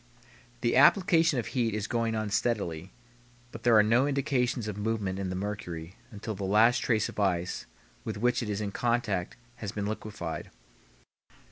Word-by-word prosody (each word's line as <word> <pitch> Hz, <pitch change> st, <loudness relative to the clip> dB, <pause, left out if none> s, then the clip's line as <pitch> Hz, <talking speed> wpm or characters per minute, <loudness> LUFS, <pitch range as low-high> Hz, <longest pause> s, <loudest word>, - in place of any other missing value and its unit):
The 120 Hz, -1 st, +1 dB
application 165 Hz, +1 st, +5 dB
of 120 Hz, -, -1 dB
heat 115 Hz, -5 st, +1 dB
is 105 Hz, -1 st, -2 dB
going 115 Hz, 0 st, -1 dB
on 110 Hz, -1 st, -2 dB
steadily, 95 Hz, -7 st, -1 dB, 0.6 s
but 115 Hz, -, -9 dB
there 115 Hz, -2 st, +5 dB
are 105 Hz, -, +7 dB
no 120 Hz, +6 st, +3 dB
indications 130 Hz, -5 st, 0 dB
of 105 Hz, -, -4 dB
movement 105 Hz, -2 st, -2 dB
in 95 Hz, -1 st, -2 dB
the 90 Hz, -, -3 dB
mercury 95 Hz, -4 st, -5 dB, 0.2 s
until 105 Hz, +1 st, -6 dB
the 100 Hz, -1 st, -6 dB
last 110 Hz, +5 st, +4 dB
trace 110 Hz, -3 st, +1 dB
of -, -, -8 dB
ice 90 Hz, -3 st, 0 dB, 0.4 s
with 110 Hz, -2 st, -4 dB
which 120 Hz, +4 st, +1 dB
it 115 Hz, -, -4 dB
is 105 Hz, 0 st, -2 dB
in 100 Hz, -1 st, -3 dB
contact 115 Hz, -6 st, -1 dB, 0.2 s
has 110 Hz, -4 st, -5 dB
been 105 Hz, -2 st, -3 dB
liquefied. 100 Hz, -6 st, -5 dB
110 Hz, 170 wpm, -29 LUFS, 100-120 Hz, 0.6 s, are